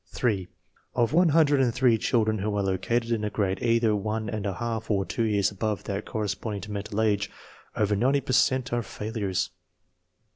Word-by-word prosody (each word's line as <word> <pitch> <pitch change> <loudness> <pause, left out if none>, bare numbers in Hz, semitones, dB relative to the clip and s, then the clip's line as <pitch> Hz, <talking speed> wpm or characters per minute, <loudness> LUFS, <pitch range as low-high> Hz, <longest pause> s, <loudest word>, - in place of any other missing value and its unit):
8. 100 -7 0 0.5
Of 120 0 +2
one 175 +1 +5
hundred 145 -3 +4
and 125 -2 +3
three 125 -1 +3
children 110 -3 +1
who 105 +1 -1
are 100 - +1
located 115 +5 0
in 110 -2 0
a 105 - 0
grade 95 -3 -1
either 115 -2 +3
one 105 +1 -2
and 105 -2 -3
a 95 - -2
half 115 -1 -3
or 100 -3 +1
two 90 - -3
years 105 -2 +2
above 105 -1 -2
that 100 +1 -4
cor 110 - -2
responding 100 0 -3
to 105 +2 -8
mental 105 +1 -3
age, 105 -2 +1 0.5
over 105 -1 +1
90 135 +7 +2
per 130 -1 -3
cent 130 -1 +2
are 120 - +1
failures. 105 -4 -3
110 Hz, 195 wpm, -27 LUFS, 100-120 Hz, 0.5 s, one